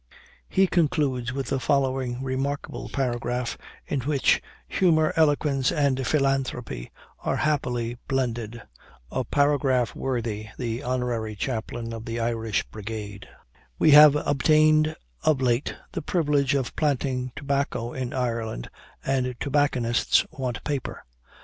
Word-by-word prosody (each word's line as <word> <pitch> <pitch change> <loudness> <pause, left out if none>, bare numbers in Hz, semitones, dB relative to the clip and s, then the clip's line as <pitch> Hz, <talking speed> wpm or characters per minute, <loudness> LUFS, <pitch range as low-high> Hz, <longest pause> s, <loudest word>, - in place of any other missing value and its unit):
He 195 - +4
concludes 145 -8 +1
with 135 -1 -4
the 135 - 0
following 130 -1 0
remarkable 135 +2 -3
paragraph, 125 -2 -2 0.3
in 140 - -2
which 140 +1 +2 0.3
humor, 160 -4 +3
eloquence, 145 -4 +2
and 135 -3 +1
philanthropy, 135 - -1 0.3
are - - -1
happily 125 -6 -1
blended 120 -3 -2 0.5
a 130 - -1
paragraph 140 -4 +2
worthy 115 -5 -3
the 120 -1 -3
Honorary 125 -4 -2
Chaplain 115 +1 -4
of 115 0 -7
the 115 +1 -3
Irish 115 -2 0
Brigade; 105 -1 -7 0.5
"We 155 - +5
have 150 0 +9
obtained 155 +2 +3 0.3
of 155 -4 +2
late 125 +1 +1 0.2
the - - -3
privilege 145 -4 +1
of 135 -3 -2
planting 130 -4 0
tobacco 140 -4 -2
in 130 -2 -3
Ireland, 115 - -3 0.3
and 130 -2 0
tobacconists 135 -5 +2
want 130 -7 -4
paper. 145 -3 -4
130 Hz, 120 wpm, -25 LUFS, 120-145 Hz, 0.5 s, have